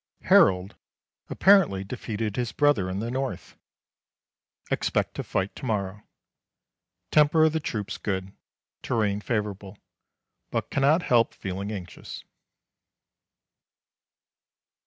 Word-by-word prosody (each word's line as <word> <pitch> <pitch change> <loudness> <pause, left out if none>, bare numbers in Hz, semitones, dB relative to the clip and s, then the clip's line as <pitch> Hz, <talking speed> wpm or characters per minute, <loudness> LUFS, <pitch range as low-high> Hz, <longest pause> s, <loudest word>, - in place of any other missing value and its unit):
Harold 95 0 +4 0.5
apparently 185 - +4
defeated 110 -1 -4
his 120 -2 -2
brother 145 -11 +2
in 95 - -3
the 115 +4 -3
North. 125 -10 -4 1.2
Expect - - 0
to - - -4
fight 95 +1 -2
to - - -8
morrow. 105 -2 -2 1.1
Temper 150 +1 +5
of 160 - +2
the 160 - +1
troops 105 -9 -4
good. 95 -1 -3 0.5
Terrain 105 -3 0
favourable, 105 -3 -3 0.7
but - - -3
cannot 145 +5 +3
help 115 -2 +2
feeling 100 +2 -5
anxious. 90 -4 -8
105 Hz, 100 wpm, -26 LUFS, 95-130 Hz, 1.2 s, Temper